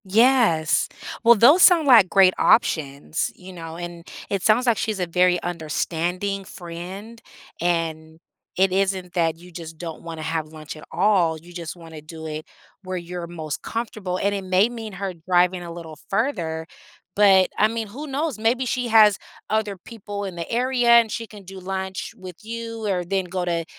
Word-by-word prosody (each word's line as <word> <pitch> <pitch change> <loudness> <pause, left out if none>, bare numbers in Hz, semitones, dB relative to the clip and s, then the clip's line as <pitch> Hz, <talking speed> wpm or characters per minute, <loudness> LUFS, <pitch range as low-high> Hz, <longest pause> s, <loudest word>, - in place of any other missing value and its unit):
Yes, 210 - +3 0.3
well, 235 0 +8
those 275 - +6
sound 345 -4 +7
like 230 -9 +7
great 190 -2 +5
options, 150 - +1
you 185 0 -12
know, 165 -2 -8
and 175 0 -8 0.2
it 200 -2 0
sounds 220 +6 +3
like 235 -4 +3
she's 215 -2 -2
a 180 - 0
very 180 +1 +2
understanding 175 +4 -2
friend, 190 +6 -9 0.4
and 160 -2 -2 0.4
it 190 0 +3
isn't 190 -2 -1
that 165 -2 +1
you 180 +2 -15
just 165 -2 -9
don't 165 -1 -7
wanna 165 -2 -7
have 160 -1 -2
lunch 155 0 -9
at 155 - -12
all, 180 -4 +2
you 170 +3 -15
just 170 -2 -6
wanna 165 -3 -11
do 160 +1 -10
it 155 0 -5 0.4
where 185 0 -4
you're 175 0 -6
most 160 -3 -6
comfortable, 215 -5 -4
and 200 +2 0
it 200 -1 -3
may 185 +4 +3
mean 225 -3 -7
her 190 0 -4
driving 180 +2 +1
a 170 -1 -7
little 165 -2 -10
further, 180 - -1 0.5
but 195 -2 +5
I 215 - +6
mean, 225 0 -4
who 280 +9 -8
knows? 280 -3 -2
Maybe 240 +4 +1
she 250 0 -1
has 215 -3 +6 0.3
other 215 -2 0
people 205 0 -7
in 190 -3 -6
the 170 - -5
area 245 0 +1
and 235 -2 +6
she 230 +1 -4
can 205 -1 -13
do 190 +1 -10
lunch 190 0 -5
with 185 -2 -10
you, 230 0 -5
or 185 -3 0
then 190 +1 -1
go 180 0 -3
to 170 -1 -1
185 Hz, 180 wpm, -23 LUFS, 170-215 Hz, 0.5 s, well